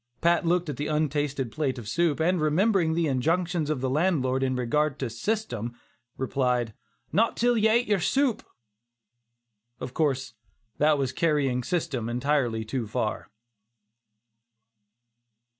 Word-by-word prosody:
Pat 170 Hz, 0 st, +2 dB
looked 175 Hz, 0 st, +2 dB
at 145 Hz, -4 st, -4 dB
the 145 Hz, -, -2 dB
untasted 145 Hz, -4 st, -1 dB
plate 145 Hz, -4 st, -1 dB
of 115 Hz, -4 st, -8 dB
soup, 165 Hz, +4 st, +1 dB
and 175 Hz, +1 st, +2 dB
remembering 165 Hz, +1 st, +2 dB
the 170 Hz, 0 st, +1 dB
injunctions 160 Hz, +4 st, 0 dB
of 150 Hz, -5 st, -1 dB
the 130 Hz, -, 0 dB
landlord 135 Hz, -5 st, +1 dB
in 130 Hz, -1 st, 0 dB
regard 135 Hz, +4 st, 0 dB
to 130 Hz, -4 st, -3 dB
"system," 120 Hz, -, -3 dB, 0.4 s
replied: 125 Hz, -3 st, 0 dB, 0.4 s
"Not 225 Hz, +3 st, +2 dB
till 245 Hz, 0 st, +3 dB
ye 220 Hz, -1 st, +3 dB
have 220 Hz, -, +3 dB
ate -, -, -11 dB
yer 205 Hz, -2 st, +2 dB
supe!" 265 Hz, -, +1 dB, 1.4 s
Of 125 Hz, 0 st, -6 dB
course 135 Hz, -5 st, 0 dB, 0.5 s
that 150 Hz, 0 st, +4 dB
was 135 Hz, -2 st, -1 dB
carrying 140 Hz, -4 st, +1 dB
"system" 140 Hz, -6 st, -2 dB
entirely 120 Hz, -3 st, 0 dB
too 115 Hz, +1 st, -3 dB
far. 110 Hz, -1 st, -3 dB
150 Hz, 140 wpm, -27 LUFS, 125-170 Hz, 1.4 s, that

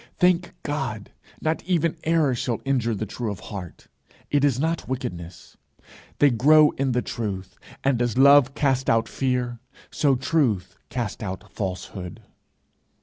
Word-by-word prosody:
Thank 180 Hz, 0 st, +2 dB
God, 135 Hz, -8 st, -3 dB, 0.3 s
not 160 Hz, +1 st, -1 dB
even 170 Hz, -3 st, +1 dB
error 160 Hz, -4 st, +3 dB
shall 120 Hz, -1 st, -2 dB
injure 120 Hz, -5 st, +1 dB
the 110 Hz, -, -3 dB
true 115 Hz, +2 st, -4 dB
of 100 Hz, -, -5 dB
heart; 95 Hz, -5 st, -9 dB, 0.4 s
it 145 Hz, -1 st, +2 dB
is 135 Hz, -4 st, +2 dB
not 160 Hz, +3 st, -1 dB
wickedness. 90 Hz, -10 st, -6 dB, 0.6 s
They 145 Hz, -1 st, +5 dB
grow 150 Hz, +6 st, +6 dB
in 135 Hz, -2 st, -1 dB
the 125 Hz, -, 0 dB
truth, 95 Hz, -5 st, -5 dB, 0.3 s
and 135 Hz, -3 st, +2 dB
as 120 Hz, -1 st, 0 dB
love 140 Hz, 0 st, +6 dB
casts 135 Hz, -2 st, +1 dB
out 115 Hz, 0 st, +3 dB
fear, 125 Hz, -2 st, -1 dB, 0.3 s
so 140 Hz, -3 st, +2 dB
truth 120 Hz, -, 0 dB
casts 120 Hz, -6 st, -4 dB
out 105 Hz, +1 st, -6 dB
falsehood. 90 Hz, -2 st, -5 dB
125 Hz, 145 wpm, -24 LUFS, 105-145 Hz, 0.6 s, grow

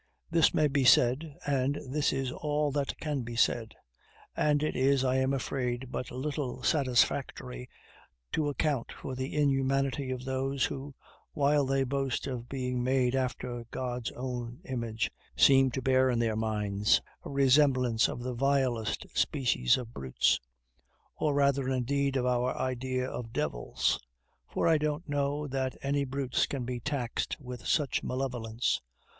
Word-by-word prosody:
This 165 Hz, -1 st, +5 dB
may 155 Hz, -, +3 dB
be 140 Hz, -1 st, +1 dB
said, 130 Hz, +4 st, +4 dB
and 140 Hz, 0 st, +1 dB
this 145 Hz, +2 st, +1 dB
is 135 Hz, -1 st, -2 dB
all 150 Hz, +1 st, -1 dB
that 140 Hz, 0 st, -2 dB
can 150 Hz, -3 st, -2 dB
be 120 Hz, 0 st, -6 dB
said; 115 Hz, -1 st, +1 dB, 0.6 s
and 150 Hz, -1 st, +2 dB
it 155 Hz, -, -1 dB
is, 135 Hz, 0 st, +3 dB
I 130 Hz, 0 st, +2 dB
am 130 Hz, 0 st, +2 dB
afraid, 130 Hz, -2 st, -2 dB
but 125 Hz, -, -4 dB
little 130 Hz, -2 st, -4 dB
satisfactory 120 Hz, -, +1 dB, 0.6 s
to 150 Hz, -2 st, 0 dB
account 145 Hz, -3 st, -1 dB
for 130 Hz, -, -7 dB
the 130 Hz, +2 st, -4 dB
inhumanity 135 Hz, -1 st, +1 dB
of 130 Hz, 0 st, -4 dB
those 135 Hz, 0 st, 0 dB
who, 140 Hz, +2 st, -6 dB, 0.4 s
while 145 Hz, -1 st, +2 dB
they 135 Hz, 0 st, +2 dB
boast 135 Hz, -1 st, -1 dB
of 120 Hz, -3 st, -5 dB
being 125 Hz, -2 st, -2 dB
made 130 Hz, -1 st, +2 dB
after 125 Hz, -2 st, -2 dB
God's 125 Hz, -2 st, -3 dB
own 125 Hz, 0 st, -5 dB
image, 115 Hz, -6 st, -2 dB, 0.3 s
seem 135 Hz, -1 st, +6 dB
to 130 Hz, +1 st, -4 dB
bear 130 Hz, 0 st, +4 dB
in 125 Hz, -, +1 dB
their 115 Hz, -2 st, +1 dB
minds 105 Hz, -2 st, +1 dB, 0.2 s
a -, -, -7 dB
resemblance 130 Hz, -4 st, +4 dB
of 120 Hz, -, -5 dB
the 125 Hz, 0 st, -3 dB
vilest 130 Hz, -3 st, 0 dB
species 120 Hz, -, +2 dB
of 120 Hz, -2 st, -7 dB
brutes; 65 Hz, -2 st, +1 dB, 0.8 s
or 150 Hz, -2 st, 0 dB
rather, 140 Hz, -2 st, +2 dB
indeed, 135 Hz, +2 st, 0 dB
of 125 Hz, -, 0 dB
our 125 Hz, 0 st, +1 dB
idea 130 Hz, 0 st, -1 dB
of 115 Hz, -3 st, -6 dB
devils; -, -, 0 dB, 0.5 s
for -, -, 0 dB
I 160 Hz, -2 st, +4 dB
don't 150 Hz, +3 st, -2 dB
know 145 Hz, +1 st, -1 dB
that 130 Hz, -1 st, -2 dB
any 140 Hz, 0 st, +1 dB
brutes 135 Hz, -1 st, 0 dB
can 135 Hz, -4 st, -3 dB
be 125 Hz, 0 st, -3 dB
taxed 125 Hz, -2 st, -2 dB
with 125 Hz, -4 st, -8 dB
such 150 Hz, -4 st, +1 dB
malevolence. 125 Hz, -3 st, -1 dB
130 Hz, 150 wpm, -30 LUFS, 125-140 Hz, 0.8 s, seem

